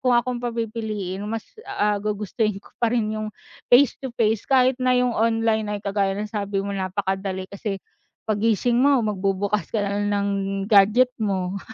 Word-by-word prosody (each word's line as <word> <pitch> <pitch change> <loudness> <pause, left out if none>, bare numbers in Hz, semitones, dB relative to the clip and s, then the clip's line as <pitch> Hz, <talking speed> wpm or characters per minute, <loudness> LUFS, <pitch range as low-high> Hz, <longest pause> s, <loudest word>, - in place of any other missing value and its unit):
kung 250 -2 +3
akong 245 0 0
papipiliin 220 -5 -3
mas 225 0 -3 0.2
ah, 210 -1 0
gugustuhin 210 0 -1
ko - - -20
pa 235 - +3
rin 220 -3 0
yung 215 0 -3 0.4
face-to-face 240 -4 +2
kahit 260 -1 +4
na 255 0 +3
yung 250 -1 +2
online 225 -2 +1
ay - - -5
kagaya 195 -1 0
ng 210 +1 -3
sabi 200 -2 -2
mo 200 - -3
napakadali 190 0 -2
kasi 200 0 -3 0.5
paggising 225 +3 +1
mo 280 0 +5
magbubukas 200 -1 -1
ka 210 -2 -1
na 200 +1 -1
lang 205 - 0
ng 200 0 0 0.4
gadget 215 +5 +5
mo. 195 -2 -1
210 Hz, 160 wpm, -23 LUFS, 200-235 Hz, 0.5 s, mo